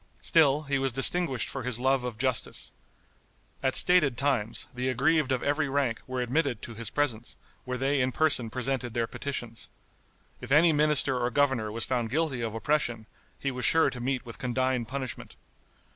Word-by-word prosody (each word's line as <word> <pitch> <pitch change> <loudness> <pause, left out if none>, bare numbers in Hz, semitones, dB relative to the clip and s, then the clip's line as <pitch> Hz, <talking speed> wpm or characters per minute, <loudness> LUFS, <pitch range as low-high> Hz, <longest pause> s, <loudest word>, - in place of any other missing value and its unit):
Still 150 -2 +4
he 140 -2 -1
was 135 0 0
distinguished 135 +1 +1
for 135 - -5
his 125 -1 0
love 130 0 +2
of 125 -3 -5
justice. 130 -1 -2 0.9
At 130 -1 0
stated 155 -9 +4
times 125 -6 -1
the 125 +1 -2
aggrieved 140 +3 +2
of 130 - 0
every 145 0 0
rank 135 -5 0
were 130 -1 -3
admitted 125 -2 -1
to 115 - -6
his 115 +1 -3
presence, 120 -6 -2 0.3
where 125 0 -3
they 135 +1 +1
in 130 0 +1
person 140 -6 +2
presented 125 -1 -3
their 115 -1 +1
petitions. 120 -2 -5 0.7
If - - -8
any 160 +3 +6
minister 145 -3 +3
or 120 0 0
governor 130 -5 +1
was 115 +1 -2
found 120 -3 -1
guilty 145 -2 -1
of 115 -1 -3
oppression, 120 -3 -1 0.3
he 135 - -2
was 125 -1 -5
sure 160 +7 +4
to 125 - -7
meet 130 +1 -2
with 115 - -9
condign 130 -1 -1
punishment. 130 +1 -6
130 Hz, 175 wpm, -28 LUFS, 120-140 Hz, 0.9 s, any